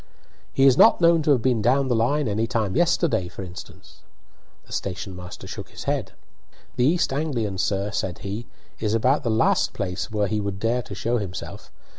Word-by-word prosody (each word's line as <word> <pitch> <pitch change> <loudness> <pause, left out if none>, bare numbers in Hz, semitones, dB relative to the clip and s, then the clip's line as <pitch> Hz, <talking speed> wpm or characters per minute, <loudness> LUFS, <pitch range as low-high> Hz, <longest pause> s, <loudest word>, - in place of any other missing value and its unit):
"He 135 - +3
is 130 -2 +5
not - - +7
known 170 -1 +5
to 150 - -1
have 130 -6 +4
been 125 -4 +2
down 130 +5 +3
the 125 - +1
line 135 +5 +1
any 110 +2 0
time 115 -5 -1
yesterday, 165 - +2
for 95 - -8
instance?" 90 -1 -11 0.6
The - - -19
station 95 0 -4
master 90 0 -9
shook - - -7
his - - -9
head. - - -2 0.6
"The 125 - +2
East 160 -1 +2
Anglian, 120 -10 -2
sir," 100 +2 0
said 95 -4 -2
he, 100 +4 -6 0.3
"is 110 0 0
about 130 +6 +2
the 115 - -2
last 110 0 +2
place 90 +1 -3
where 105 -2 0
he 105 +1 -1
would 100 -1 -3
dare 115 +4 0
to 105 -4 -9
show 120 +5 0
himself. 95 -4 -7
115 Hz, 195 wpm, -24 LUFS, 100-130 Hz, 0.6 s, not